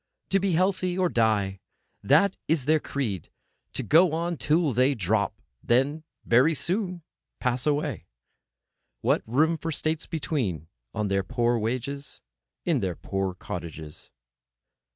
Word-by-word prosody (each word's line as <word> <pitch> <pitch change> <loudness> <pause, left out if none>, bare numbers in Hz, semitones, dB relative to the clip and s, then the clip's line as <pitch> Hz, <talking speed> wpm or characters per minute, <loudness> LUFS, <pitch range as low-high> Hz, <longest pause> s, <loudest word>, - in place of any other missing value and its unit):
To 195 - +3
be 195 -1 +1
healthy, 185 +1 +1
or—die! 110 - +1 0.4
That 170 +8 +4
is 150 -4 +1
their 155 +2 +4
creed. 115 - -3 0.4
To - - -2
go 165 +2 +5
on 170 +1 -1
till 155 -1 +2
they 130 +4 +3
drop 105 0 0 0.2
—then 135 +6 +1 0.2
very 130 +8 +4
soon 180 +1 -2 0.4
pass 125 +1 0
away! 145 - -1 0.9
What - - +2
room 155 +8 +3
for 165 +1 -3
states 155 +1 -1
between—on 100 - -3
their 100 0 +1
poor 120 +5 +1
wage, 115 +3 -1 0.8
in 165 -6 +2
their 95 -5 -2
poor 95 0 -3
cottages? 80 -4 -7
135 Hz, 125 wpm, -27 LUFS, 105-165 Hz, 0.9 s, go